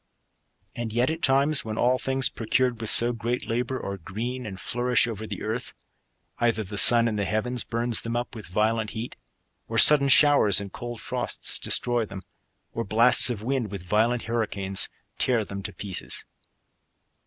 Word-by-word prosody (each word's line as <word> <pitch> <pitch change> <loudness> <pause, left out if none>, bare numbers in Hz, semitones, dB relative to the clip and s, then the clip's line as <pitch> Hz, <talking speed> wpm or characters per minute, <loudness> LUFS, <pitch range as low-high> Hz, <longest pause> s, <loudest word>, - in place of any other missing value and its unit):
And 120 -2 -5
yet 120 +6 +1
at 160 +1 -6
times, 140 +1 +4
when 110 -1 -6
all 125 +1 +2
things, 135 0 0
procured 120 +1 -1
with 110 - -3
so 120 +1 +3
great 120 +2 -4
labour, 125 +3 -2
are 100 0 -5
green 120 +8 -6
and 95 -2 -8
flourish 125 0 0
over 110 -2 -6
the 100 -3 -7
earth, 115 +3 -4 0.7
either 115 -2 0
the 100 +1 -2
sun 120 -1 +6
in 110 -2 -2
the 100 - -1
heavens 120 +4 -2
burns 120 0 -1
them 115 0 -5
up 120 +1 -3
with 110 -4 -9
violent 110 +4 -1
hea^ 115 +1 -6 0.5
or - - -4
sudden 140 -2 +7
showers 135 -8 +5
and 100 -2 -8
cold 120 -1 -7
frosts - - 0
destroy 120 -1 +2
them, 95 -3 -9 0.5
or 115 - -3
bla3ts 115 +5 +4
of 110 -4 -5
winds, 125 -2 -2
with 100 -2 -7
violent 110 +6 0
hurricanes, 100 -4 -1 0.3
tear 120 -4 +1
them 100 0 -7
to - - -6
pieces. 100 -3 -4
115 Hz, 175 wpm, -25 LUFS, 105-125 Hz, 0.7 s, sudden